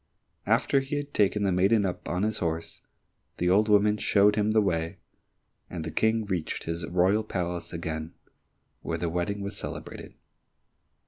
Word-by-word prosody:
After 135 - +3
he 135 +2 -4
had 145 0 -4
taken 105 0 +2
the 100 - +2
maiden 100 +4 +3
up 90 - -4
on 90 +3 -1
his 110 0 0
horse, 85 -1 -3 0.6
the 90 0 +1
old 105 +3 +4
woman 105 0 +4
showed 105 0 +4
him 105 0 +1
the 110 0 +4
way, 85 -5 -1 0.7
and 85 -3 -5
the 80 - -5
King 110 +6 +1
reached 90 -5 -3
his 85 -1 -3
royal 95 +5 +2
palace 90 -4 -4
again, 80 0 -5 0.7
where - - -3
the 85 - -2
wedding 90 +4 -2
was 100 0 -5
celebrated. - - -7
95 Hz, 165 wpm, -27 LUFS, 85-105 Hz, 0.7 s, old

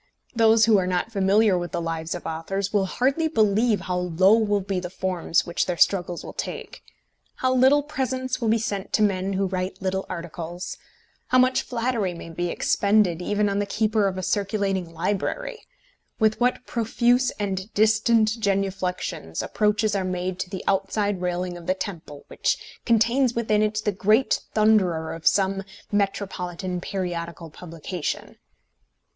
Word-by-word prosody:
Those 225 -2 +5
who 220 -3 +5
are 180 - -1
not 185 +4 -1
familiar 200 -1 +3
with 175 -1 -5
the 175 - 0
lives 165 0 -3
of 175 - -8
authors 190 +5 -3
will 195 -2 +2
hardly 275 - +1
believe 220 - +2
how 180 -1 -2
low 180 +3 +4
will 210 -2 +2
be 190 -1 -2
the 180 -1 -5
forms 180 -2 0
which 170 0 -1
their 180 -2 -2
struggles 175 -1 +2
will - - -8
take: - - -6 0.5
how 255 0 +1
little 265 +3 +5
presents 260 -4 -2
will 230 - 0
be 225 - +4
sent 205 -3 -4
to 215 - +3
men 195 -1 0
who 195 +1 0
write 185 0 -3
little 190 0 -2
articles; 170 0 -6 0.5
how 255 - +3
much 255 0 +4
flattery 230 -6 -2
may 165 0 -9
be 175 +2 -2
expended 200 -2 +2
even 205 +3 +1
on 200 0 0
the 205 - -1
keeper 215 0 +1
of 190 -1 -3
a 185 - -4
circulating 195 -3 -1
library; 200 - -3 0.5
with 220 -1 +2
what 250 +1 +1
profuse 240 +2 +2
and 195 0 -3
distant 220 +1 +3
genuflexions 190 - -2
approaches 210 0 +1
are 195 - 0
made 185 0 -3
to 185 - -3
the 190 -1 -6
outside 195 0 0
railing 180 0 -2
of 175 -1 -10
the 185 - +2
temple 170 -7 -7
which - - 0 0.3
contains 235 +2 +3
within 215 -2 +1
it 215 0 0
the 210 - +2
great 215 +6 +2 0.2
thunderer 195 -7 +3
of 165 -1 -4
some 195 0 +3 0.3
metropolitan 185 -3 -2
periodical 170 -3 -4
publication! 170 0 -5
195 Hz, 160 wpm, -24 LUFS, 180-220 Hz, 0.5 s, Those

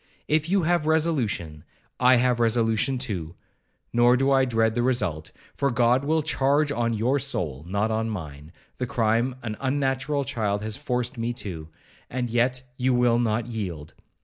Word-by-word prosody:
If 155 +1 +1
you 195 -1 +2
have 170 -1 +1
resolution, 125 - 0 0.4
I 125 +1 +6
have 125 0 +2
resolution 115 +2 +1
too; 95 -10 -4 0.6
nor 120 +1 +5
do 135 +2 +2
I 135 -1 +4
dread 115 -2 +1
the 120 - 0
result, 105 -12 -1 0.2
for 140 - +1
God 120 +2 +2
will 160 +1 +1
charge 145 0 +1
on 115 -3 0
your 125 +6 +1
soul, 80 - -3
not 100 +4 0
on 110 +1 -1
mine, 75 -7 -7 0.3
the 125 - -1
crime 120 0 +1
an 110 -2 -4
unnatural 135 +1 0
child 105 -5 -2
has 110 -1 -3
forced 125 -3 -2
me 115 +1 -1
to—and 105 +5 -7
yet 125 +2 +1
you 130 0 +1
will 120 -1 +3
not 115 -1 0
yield. 95 -10 -5
120 Hz, 160 wpm, -25 LUFS, 110-135 Hz, 0.6 s, I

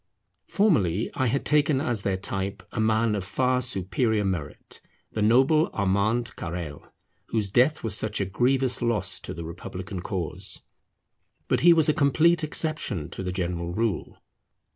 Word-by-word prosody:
Formerly 115 - +2
I 130 - 0
had 135 +4 -1
taken 150 -2 +3
as 120 -7 -1
their 95 -2 -1
type 95 +1 -3
a - - -4
man 110 0 +2
of 100 -3 -2
far 125 +6 +1
superior 110 -1 0
merit, 85 -6 -5 0.3
the 110 - -3
noble 135 +9 +4
Armand 100 +4 0
Carrel, 85 -4 -6 0.4
whose 105 -4 -1
death 130 +8 +3
was 110 -4 0
such 110 - -1
a 100 - 0
grievous 125 +6 +1
loss 110 -6 0
to - - -8
the 85 +1 -6
republican 90 +2 -7
cause. 95 0 -4 0.8
But - - +1
he 175 - +6
was 160 -3 +5
a 155 - +4
complete 155 +4 +3
exception 150 - 0
to - - -6
the 90 -1 -3
general 85 -2 -3
rule. 110 -2 -2
110 Hz, 155 wpm, -26 LUFS, 95-130 Hz, 0.8 s, he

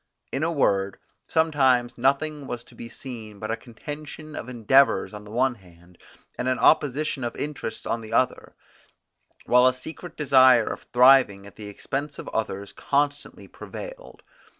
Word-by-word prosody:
In 135 - -2
a 165 +2 +1
word, 100 -10 +1 0.3
sometimes 135 -7 +2
nothing 140 +3 0
was 120 -1 -5
to - - -20
be 115 - -9
seen 110 -5 -8
but 110 +2 -5
a - - 0
contention 150 +5 -9
of 120 - -6
endeavours 125 +1 +3
on 105 0 -9
the - - -12
one 130 +3 +2
hand, 90 -4 -20 0.4
and 125 - -1
an 130 0 +1
opposition 145 -2 +2
of 120 - -3
interests 145 -6 -5
on 115 - -2
the 110 0 -10
other, 125 +2 0 0.9
while 125 +1 +5
a 130 - +3
secret 160 +6 -9
desire 130 -5 +6
of - - -13
thriving 125 -6 +5
at 100 -3 -14
the 105 -1 -9
expense 140 +8 -5
of - - -8
others 100 -2 -4
constantly 145 0 -2
prevailed. - - -10
130 Hz, 160 wpm, -25 LUFS, 110-145 Hz, 0.9 s, desire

